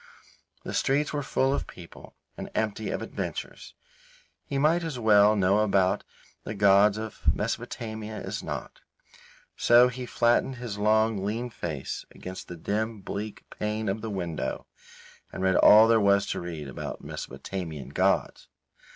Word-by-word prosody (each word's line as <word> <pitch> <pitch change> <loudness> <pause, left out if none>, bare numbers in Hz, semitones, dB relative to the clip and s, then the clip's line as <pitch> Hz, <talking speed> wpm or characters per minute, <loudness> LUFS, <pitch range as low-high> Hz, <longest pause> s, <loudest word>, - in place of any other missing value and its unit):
The - - -6
streets 145 +3 +1
were 145 - -1
full 135 0 +1
of - - -2
people 85 -2 -13 0.2
and - - -7
empty 110 0 -1
of - - -3
adventures. - - -6 0.7
He 140 - -2
might 160 +5 +3
as 160 -5 -4
well 105 -2 +5
know 100 +1 +3
about 95 -3 +2 0.4
the 105 - -5
gods 100 +1 +5
of 110 0 -6 0.2
Mesopotamia 110 -1 -4
as - - -5
not; - - -6 0.8
so 120 +1 +6
he 125 0 -6
flattened 120 +3 +2
his 120 -5 -6
long, 110 -1 +2
lean 115 +4 -3
face 80 -10 -5
against 95 0 -8
the 90 - -8
dim 105 +5 -2
bleak 105 +2 -6
pane 105 +1 -3
of 100 +3 -1
the 115 - -4
window 85 -9 -3 0.7
and - - -5
read 95 -1 +3
all 110 +2 +8
there 115 -1 +4
was 100 0 +4
to - - -2
read 80 -4 -6
about 65 - -7
Mesopotamian 80 -8 -6
gods. - - 0
105 Hz, 150 wpm, -27 LUFS, 95-115 Hz, 0.8 s, all